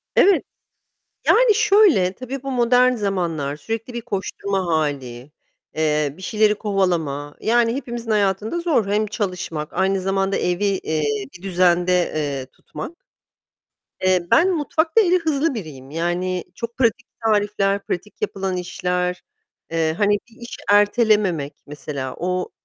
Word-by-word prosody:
Evet. 395 0 +5 0.8
Yani, 475 -3 +5
şöyle, 390 - +4
tabii 255 +3 -7
bu 270 - -3
modern 250 0 +4
zamanlar 170 -9 -2
sürekli 225 - -5
bir 235 - -4
koşturma 200 -3 -3
hâli, 140 -5 -2 0.4
eee, 150 -2 +1
bir 185 - -13
şeyleri 210 +1 +2
kovalama. 170 -9 -1
Yani 235 +1 +2
hepimizin 240 -4 -4
hayatında 210 - +1
zor. 315 - +1
Hem 210 +2 +1
çalışmak 180 -7 -4
aynı 190 +1 +1
zamanda 195 +1 0
evi, 180 +3 0
eee, 170 -6 -1 0.3
bir 175 - -23
düzende, 180 -1 +2 0.2
eee, 140 -4 -2
tutmak. 155 - -9 1.1
Eee, 185 -2 +2
ben 360 +3 +5
mutfakta 320 +7 +2
eli 365 -2 +3
hızlı 315 -2 0
biriyim. 145 - -8
Yani 175 +2 -1
çok 235 0 -6
pratik 240 -1 +1 0.2
tarifler, 205 -2 +1
pratik 210 +4 -5
yapılan 190 -1 -2
işler, 180 0 -2 0.5
eee, 160 -1 +1
hani, 205 -1 +3 0.2
bir 230 +1 -20
iş 235 - -8
ertelememek, 205 - +3
mesela. 140 -2 -5
O 180 +1 -1
195 Hz, 130 wpm, -21 LUFS, 170-230 Hz, 1.1 s, Evet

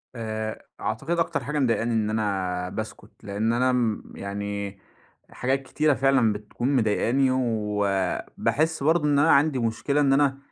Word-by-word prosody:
آآ، 110 -1 -4
أعتقد 165 +10 -2
أكتر 160 -5 0
حاجة 150 +2 -2
مضايقني 115 -2 +1
إن 110 -1 +1
أنا 95 -4 -1
باسكت، - - -7
لأن 105 +3 -1
أنا 125 +2 +2
م 120 -4 0
يعني 100 0 -5 0.5
حاجات 135 +2 -1
كتيرة 150 +2 +1
فعلًا 135 -5 +3
بتكون 120 +6 -2
مضايقني، 120 +4 +2
وباحس 110 - 0
برضو 160 0 +3
إن 145 -1 +3
أنا 160 +3 +5
عندي 140 -2 +4
مشكلة 120 +6 0
إن 135 -1 +4
أنا 135 -1 +3
115 Hz, 145 wpm, -25 LUFS, 105-135 Hz, 0.5 s, أنا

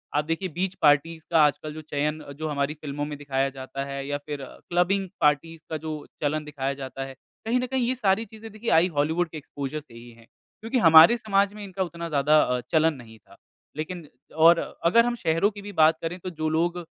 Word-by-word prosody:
आप 150 0 +1
देखिए, 165 +4 -2
बीच 180 +4 -3
पार्टीज़ 155 +2 +3
का 165 - +4
आजकल 150 +1 -2
जो 155 - -8
चयन, 150 +1 -2 0.2
जो 155 - -2
हमारी 140 0 -1
फिल्में 145 -1 -4
में 145 -1 -6
दिखाया 135 -1 -1
जाता 135 0 -6
है 140 0 -5
या 145 0 -1
फिर 145 -2 -5 0.3
क्लबिंग 185 +2 +1
पार्टीज़ 155 +2 +1
का 160 - -2
जो 155 -1 -6 0.2
चलन 150 +1 0
दिखाया 140 -2 -3
जाता 135 -1 -6
है। 135 - -9 0.3
कहीं 245 +3 +1
न 250 - -1
कहीं 255 -2 +1
ये 255 - 0
सारी 215 -2 +1
चीज़ें, 220 0 -12
देखिए, 215 +3 -5
आई 165 +3 +5
हॉलीवुड 160 +4 +1
के 155 - -8
एक्सपोज़र 145 0 -5
से 140 -6 -18
ही 120 +1 -12
हैं 115 0 -18 0.4
क्योंकि 230 +4 -1
हमारे 165 +6 +8
समाज 200 -2 +1
में 210 0 -9
इनका 190 -1 -3
उतना 170 -1 -6
ज़्यादा 150 +1 +4
अ, 125 0 0
चलन 160 0 +3
नहीं 115 -4 -13
था। - - -21 0.4
लेकिन 160 0 -5 0.4
और 170 0 +8 0.3
अगर 230 +7 +5
हम 240 - 0
शहरों 165 -1 +1
की 205 -1 -10
भी 205 0 -8
बात 160 0 +5
करें, 165 +2 -4
तो 185 - -6
जो 155 -2 -3
लोग 170 +2 0
160 Hz, 220 wpm, -25 LUFS, 145-185 Hz, 0.4 s, हमारे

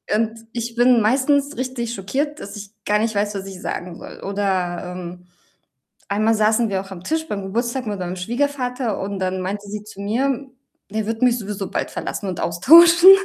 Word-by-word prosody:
Und 225 +1 -1
ich 235 0 -4
bin 240 -1 +5
meistens 280 +5 +2
richtig 250 -2 -3
schockiert, 275 +10 -2
dass 200 - -8
ich 205 0 -9
gar 210 0 +2
nicht 220 -1 0
weiß, 205 0 0
was 195 0 -4
ich 190 -1 -9
sagen 175 -1 -4
soll, - - -11
oder, 185 -3 -1
ähm 180 0 -8 0.9
einmal 215 +2 +3
saßen 220 +1 +3
wir 190 -1 0
auch 195 - -12
am 185 -2 -9
Tisch 320 +4 -1
beim 200 -2 -3
Geburtstag 235 +5 -2
mit 205 -2 -3
meinem 180 0 -3
Schwiegervater 250 +2 -1
und 195 0 -4
dann 185 0 -1
meinte 200 +2 -4
sie 210 0 -5
zu 205 -2 -11
mir, 260 +5 -1 0.4
der 215 0 -2
wird 225 +1 -3
mich 250 -1 +4
sowieso 205 -2 -5
bald - - -2
verlassen 200 - -4
und 180 - -4
austauschen. 335 - +7
215 Hz, 190 wpm, -21 LUFS, 195-250 Hz, 0.9 s, austauschen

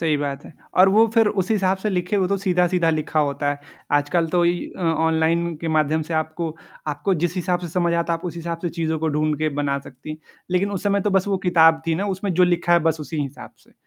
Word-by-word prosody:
सही 160 -2 +1
बात 140 -1 -4
है। - - -12 0.3
और 190 - +8
वो 220 +4 +5
फ़िर 225 -2 +5 0.2
उस 185 - -10
हिसाब 195 -3 +2
से 210 +2 -2
लिखे 180 +2 -1
हुए 185 -2 +1
तो 200 - +1
सीधा-सीधा 180 -3 +2
लिखा 155 0 0
होता 145 0 0
है। 145 - -3 0.3
आजकल 145 +4 +2
तो 175 - +4
इ 175 0 0
अ, - - -9
ऑनलाइन 160 +1 +1
के 165 - -3
माध्यम 155 0 +1
से 160 +1 -5
आपको 160 +1 -2 0.3
आपको 150 +6 -1
जिस 170 +2 -1
हिसाब 180 0 0
से 175 - -6
समझ 170 0 0
आता 170 0 0
है, 165 - -1
आप 175 - -15
उस 170 -1 -5
हिसाब 170 0 -4
से 175 - -1
चीज़ों 160 -2 -2
को 160 0 -1
ढूँढ़ 150 0 0
के 155 0 +1
बना 140 -1 0
सकती, 140 +3 -10 0.3
लेकिन 185 +3 +1
उस 195 - -4
समय 200 -1 +1
तो 205 - 0
बस 195 0 +2
वो 195 - 0
किताब 160 -2 +5
थी 165 - +1
ना, 195 +5 -2
उसमें 195 0 -2
जो 180 - +5
लिखा 175 -1 +1
है 170 - +6
बस 155 - -6
उसी 150 0 -4
हिसाब 140 0 -8
से। - - -25
170 Hz, 255 wpm, -22 LUFS, 155-180 Hz, 0.3 s, और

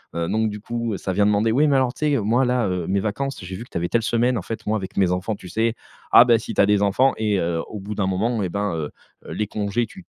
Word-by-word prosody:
heu, 85 0 -1
donc 110 0 +1
du 105 0 -7
coup 115 -2 -3
ça 95 - -4
vient 100 +2 +2
demander: 105 +2 +2
«Ouais, 145 +6 +3
mais 140 - +3
alors 130 -1 +2
tu 150 -1 -1
sais, - - +3
moi 115 +5 +2
là, 125 -2 +1
heu, 90 -2 -2
mes 95 0 +1
vacances, 135 +7 -3
j'ai 95 +1 -6
vu 115 - -8
que - - -23
tu - - -3
avais 85 +1 -2
telle 115 -1 +1
semaine, 120 +2 +1
en - - -2
fait 115 +5 -7
moi 110 +1 +1
avec 95 -2 -7
mes 95 -2 +2
enfants, 95 +4 -2
tu 90 - -12
sais?» 115 +1 0 0.4
ah 120 - +10
ben, 120 -2 +4
si 115 - -6
tu - - +3
as - - +6
des 105 0 +2
enfants 125 +7 +3
et 105 -3 0
heu, 85 -1 -1
au 105 -3 -7
bout 105 +2 -5
d'un 100 -2 -1
moment 110 +4 0
et 95 - 0
ben, 100 +1 -2
heu, 75 -2 -4 0.3
heu, - - -9
les 105 -1 -2
congés 105 +3 -1
tu 190 - -14
105 Hz, 305 wpm, -22 LUFS, 95-120 Hz, 0.4 s, ah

